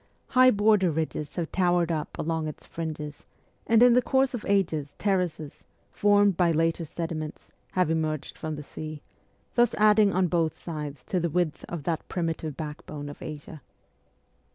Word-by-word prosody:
High 255 0 +6
border 205 -4 +4
ridges 155 -2 -3
have 170 -3 -3
towered 175 -2 +2
up 155 -2 -3
along 160 0 -1
its 155 - -8
fringes, 155 -3 -6 0.4
and 225 +1 +6
in 245 -1 +7
the 250 - +5
course 265 +1 +2
of 240 - -4
ages 165 -8 0
terraces, 180 -7 -1 0.3
formed 205 -1 +4
by 175 0 +3
later 165 +1 +1
sedi 165 +2 -4
ments, 155 -1 -7 0.2
have 180 -3 +2
emerged 155 -2 -2
from 155 -1 -4
the 150 - -7
sea, 155 0 -8 0.5
thus 240 -1 +3
adding 210 -1 +5
on 185 0 +2
both 170 -2 0
sides 150 -5 -6
to 185 - +1
the 170 0 0
width 170 -1 -1
of 170 -4 -5
that 165 +1 -3
primitive 160 -4 -3
backbone 150 -1 -6
of 145 - -11
Asia. 155 0 -8
165 Hz, 165 wpm, -27 LUFS, 155-195 Hz, 0.5 s, in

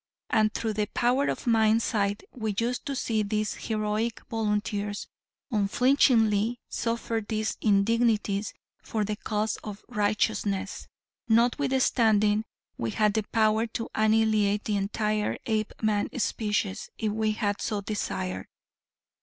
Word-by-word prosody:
And 215 0 +3
through 220 0 -2
the 210 0 -1
power 250 +6 +1
of - - -3
mind 225 -1 +4
sight 205 -1 0
we 220 -4 -3
used 240 +5 -1
to 280 - -2
see 225 -4 0
these 215 +1 -1
heroic 215 +1 -2
volunteers 210 -1 -1 0.5
unflinchingly 225 0 +3
suffer 230 -1 -2
these 215 0 -2
indignities 215 -1 +2 0.3
for 215 -2 -2
the 210 +1 -2
cause 210 0 -2
of 210 -1 -9
righteousness, 205 -1 -1 0.4
notwithstanding 230 -3 +3 0.3
we 115 - -1
had 210 - +2
the 220 - +1
power 220 0 +3
to 230 0 -5
annihilate 215 -1 +2
the 210 - -1
entire 210 +1 0
Apeman 215 -1 0
species, 210 -2 -1
if 215 -1 -1
we 215 0 0
had 205 -2 -1
so 210 -2 -1
desired. 95 - -3
215 Hz, 120 wpm, -27 LUFS, 210-225 Hz, 0.5 s, mind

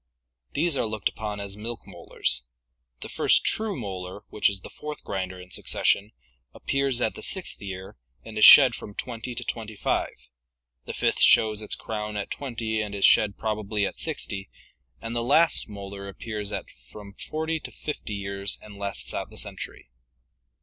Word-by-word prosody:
These 160 -1 +2
are 115 - +1
looked 110 -1 -1
upon 105 -1 -5
as 100 -1 -4
milk 115 +2 -5
molars. - - -1 0.6
The - - -5
first - - +3
true 215 -7 +1
molar, 95 -2 -6
which 105 - +3
is 100 -1 -4
the - - -10
fourth 150 0 -7
grinder 95 -1 -4
in 90 0 -12
succession, 100 +2 +1 0.4
appears 135 -2 +1
at 110 - +1
the - - -9
sixth 190 - -2
year 95 -5 -7 0.3
and 110 - -9
is 110 - +2
shed 135 -4 +11
from 105 -2 -8
twenty 120 0 -4
to 120 - 0
twenty 110 -2 -5
five, - - -1 0.7
the - - -5
fifth - - +1
shows 110 -1 +5
its 105 - +2
crown 105 -1 -4
at 100 - -4
twenty 115 -5 -2
and 105 -1 -4
is 100 - +3
shed 105 -2 +5
probably 105 -1 -1
at - - -5
sixty, 95 -1 -3 0.5
and 115 +1 -5
the 120 - +1
last 145 +3 +3
molar 100 -1 -7
appears 105 +1 -5
at - - -3 0.2
from 100 -1 -11
forty 160 +7 -2
to - - -6
fifty 145 -8 -5
years 100 0 -2
and 105 -2 -12
lasts 100 -1 -3
out - - -3
the - - -13
century. - - -6
105 Hz, 175 wpm, -26 LUFS, 100-120 Hz, 0.7 s, shed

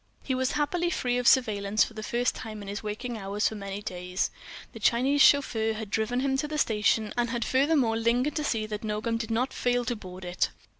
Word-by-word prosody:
He 265 - -1
was 260 +1 0
happily 340 +4 0
free 245 -7 0
of 245 - 0
surveillance 215 -5 +4
for - - -6
the 215 - -6
first 240 +3 0
time 215 -2 -7
in - - -10
his 200 +1 -4
waking 220 +2 -4
hours 200 +2 -1
of 215 - -6
many 200 +1 -6
days. 180 -1 -2 0.4
The - - -9
Chinese 265 +4 +3
chauffeur 225 -7 +4
had 215 -2 -6
driven 230 +4 0
him 270 0 +1
to 295 - -1
the 305 0 -4
station, 215 -3 +1
and 240 -1 0
had 235 -1 -2
furthermore 265 -4 +2
lingered 240 +5 +1
to 300 - -1
see 225 -6 0
that 210 0 -5
Nogam 220 +2 -1
did 225 -1 -4
not 240 +4 0
fail 245 0 0
to 240 - -1
board 185 -3 -9
it. 180 +1 0
230 Hz, 220 wpm, -28 LUFS, 210-255 Hz, 0.4 s, surveillance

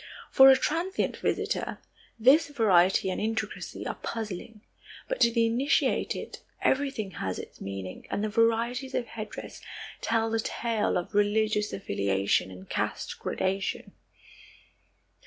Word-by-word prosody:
For 265 0 +9
a 265 - +8
transient 335 +8 -1
visitor, - - -1 0.4
this 275 +7 +5
variety 190 -8 +3
and - - -3
intricacy 220 -1 -3
are - - -2
puzzling, 215 -1 -5 0.5
but - - -2
to 235 - +5
the 230 -1 +3
initiated 245 +6 0 0.2
everything 265 -7 0
has 95 - -4
its - - -10
meaning 95 -1 -6
and 205 - -2
the - - +1
varieties 230 +4 +1
of 240 - 0
headdress 215 -2 -8 0.4
tell 225 0 +1
the 225 - +1
tale 225 0 0
of 175 +4 -4
religious 210 +1 +2
affiliation 100 - 0
and 95 0 -11
caste - - -3
gradation. 195 +1 -2
220 Hz, 125 wpm, -28 LUFS, 195-235 Hz, 0.5 s, For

